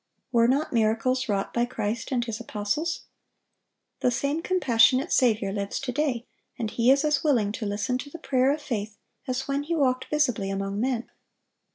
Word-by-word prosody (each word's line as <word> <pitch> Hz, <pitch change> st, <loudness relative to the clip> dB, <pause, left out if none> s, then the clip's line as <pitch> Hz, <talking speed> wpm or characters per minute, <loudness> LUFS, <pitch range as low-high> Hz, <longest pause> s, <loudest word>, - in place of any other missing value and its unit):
Were 230 Hz, -1 st, +4 dB
not 275 Hz, +5 st, +1 dB
miracles 230 Hz, +3 st, +1 dB
wrought 200 Hz, -1 st, -1 dB
by 240 Hz, 0 st, +2 dB
Christ 230 Hz, 0 st, -3 dB
and 240 Hz, -2 st, 0 dB
His 230 Hz, -1 st, -4 dB
apostles? 230 Hz, +9 st, -2 dB, 1.0 s
The -, -, +2 dB
same 280 Hz, +6 st, -1 dB
compassionate 265 Hz, -5 st, +3 dB
Saviour 215 Hz, -6 st, +3 dB
lives 200 Hz, 0 st, -3 dB
to 270 Hz, -2 st, -3 dB
day, 260 Hz, -3 st, -1 dB, 0.3 s
and 220 Hz, -3 st, -3 dB
He 235 Hz, +1 st, +2 dB
is 275 Hz, +3 st, +5 dB
as 295 Hz, -2 st, +1 dB
willing 240 Hz, -10 st, +2 dB
to 215 Hz, 0 st, -4 dB
listen 210 Hz, +5 st, -1 dB
to 285 Hz, -, -7 dB
the 335 Hz, -, -8 dB
prayer 265 Hz, -4 st, +2 dB
of 300 Hz, +1 st, -3 dB
faith 215 Hz, -6 st, -4 dB, 0.3 s
as 255 Hz, +1 st, -2 dB
when 280 Hz, 0 st, 0 dB
He 325 Hz, +4 st, -2 dB
walked 260 Hz, -4 st, +1 dB
visibly 250 Hz, -10 st, 0 dB
among 195 Hz, +1 st, -2 dB
men. 245 Hz, -1 st, -1 dB
250 Hz, 180 wpm, -26 LUFS, 220-280 Hz, 1.0 s, is